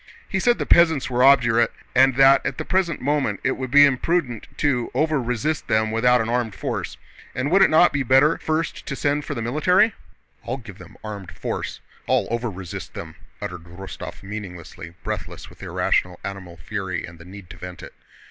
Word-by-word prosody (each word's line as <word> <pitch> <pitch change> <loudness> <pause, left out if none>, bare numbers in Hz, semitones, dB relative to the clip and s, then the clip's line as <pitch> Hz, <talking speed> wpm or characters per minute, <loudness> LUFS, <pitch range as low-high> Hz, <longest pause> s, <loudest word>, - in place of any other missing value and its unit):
He 190 - -1
said 240 +4 +3
the - - -2
peasants 160 -6 +4
were 125 +1 +2
obdurate 120 -4 +5 0.2
and 130 0 +5
that 135 +1 +6
at 135 - -3
the - - -4
present 185 -4 0
moment 135 -7 0
it 130 - +2
would 130 -1 -4
be 145 +2 +8
imprudent 140 -3 0
to 125 -5 0
"overresist" 150 -1 0
them 110 0 +1
without 125 +2 +3
an 110 - -2
armed 115 -3 -1
force, - - -4 0.4
and 135 +4 -1
would 195 +2 +5
it 195 - +6
not 160 +3 +5
be 145 - 0
better 135 +5 +4
first 160 +1 -2
to 140 - -3
send 145 +1 0
for 145 - -4
the 115 - -3
military? 180 - +3 0.5
"I'll 125 - -3
give 115 -7 -12
them 90 +3 -14
armed 105 -4 -7
force... - - -5 0.3
I'll - - +2
'overresist' 105 -7 -5
them!" - - -8 0.3
uttered 90 -3 -6
Rostóv 90 +3 -9
meaninglessly, 90 -4 -8
breathless - - -6
with - - -17
irrational 90 -1 0
animal 95 -3 -7
fury 95 +2 -4
and 85 -1 -13
the - - -11
need 95 0 -11
to - - -11
vent 90 -1 -9
it. - - -10
125 Hz, 185 wpm, -23 LUFS, 100-145 Hz, 0.5 s, be